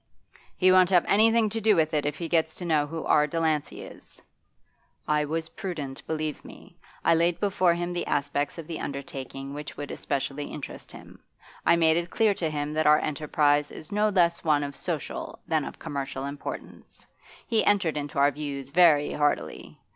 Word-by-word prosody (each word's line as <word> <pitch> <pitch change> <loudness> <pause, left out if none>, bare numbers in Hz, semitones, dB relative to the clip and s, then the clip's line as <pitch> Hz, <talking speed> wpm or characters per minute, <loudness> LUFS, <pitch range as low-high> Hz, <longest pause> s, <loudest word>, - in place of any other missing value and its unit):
'He 185 0 +5
won't 185 -1 +6
have 180 -3 +4
anything 225 +2 +4
to 225 - -3
do 215 -1 +4
with 160 -2 +1
it 150 -1 +1
if 150 - -3
he 170 - -4
gets 160 -1 +1
to 180 - -7
know 155 -3 +2
who 160 +1 -5
R. 150 0 +4
Delancey 160 -2 -1
is.' - - -13 0.9
'I 150 0 +2
was 160 +2 -3
prudent, 160 -10 -6
believe 155 -2 -3
me. - - -14 0.3
I 165 - +5
laid 170 +1 +2
before 185 -4 +2
him 175 +1 -3
the 175 - -3
aspects 145 +1 -1
of 165 - -7
the 165 0 -6
undertaking 140 -1 -6
which 150 +1 -7
would 145 0 -6
especially 140 +1 -3
interest 150 - -8
him. - - -13 0.5
I - - +6
made 165 -1 +3
it 170 0 -2
clear 220 +1 +2
to 165 -4 -2
him 150 0 -3
that 155 0 +1
our 150 0 +7
enterprise 150 -1 +1
is 155 - -11
no 210 +1 +2
less 170 -4 +2
one 150 -2 +2
of 140 -1 -5
social - - -5
than - - +1
of - - -8
commercial 135 -1 -5
importance; 140 +1 -8 0.4
he 225 -3 +2
entered 190 -6 +2
into 145 -1 -5
our 140 +1 +4
views 140 -2 -6
very 155 -3 +5
heartily. 145 0 -2
155 Hz, 185 wpm, -26 LUFS, 145-175 Hz, 0.9 s, our